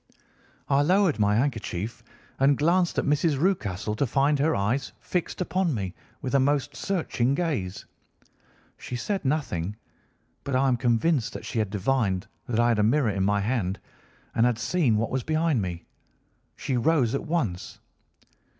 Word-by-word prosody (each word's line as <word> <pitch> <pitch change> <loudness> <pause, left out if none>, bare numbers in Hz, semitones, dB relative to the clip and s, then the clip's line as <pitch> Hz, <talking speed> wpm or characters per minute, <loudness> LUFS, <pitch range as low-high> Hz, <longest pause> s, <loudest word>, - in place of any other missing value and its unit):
I 140 0 +3
lowered 180 - +3
my 105 0 +3
handkerchief 115 -3 -2 0.4
and 135 0 +4
glanced 170 +3 +2
at - - +1
Mrs. 150 +1 +2
Rucastle 105 - 0
to 140 - +1
find 140 +4 +2
her 155 +3 +2
eyes 120 +7 -1
fixed 180 0 -3
upon 180 -4 0
me 95 -4 -3 0.3
with 130 - -3
a 140 - +5
most 140 +1 +1
searching 140 -9 0
gaze. 130 - -2 0.9
She 125 - -6
said 195 +11 -2
nothing, 120 - -1 0.7
but 140 - -2
I 135 +1 +3
am 125 - +3
convinced 120 +3 +1
that - - -7
she 115 - -2
had 105 -3 0
divined 100 -2 0 0.2
that 115 -2 -1
I 120 0 +4
had 115 -2 +2
a - - +4
mirror 120 +1 +3
in 95 -1 -1
my 100 +1 +2
hand 100 -4 -1 0.5
and 115 - +2
had 120 -2 0
seen 120 -1 +1
what 115 +1 -1
was 130 - 0
behind 155 -3 +1
me. 85 -3 -5 0.7
She 130 - -2
rose 130 -3 +2
at 140 - -2
once. 125 - -2
130 Hz, 165 wpm, -26 LUFS, 105-150 Hz, 0.9 s, a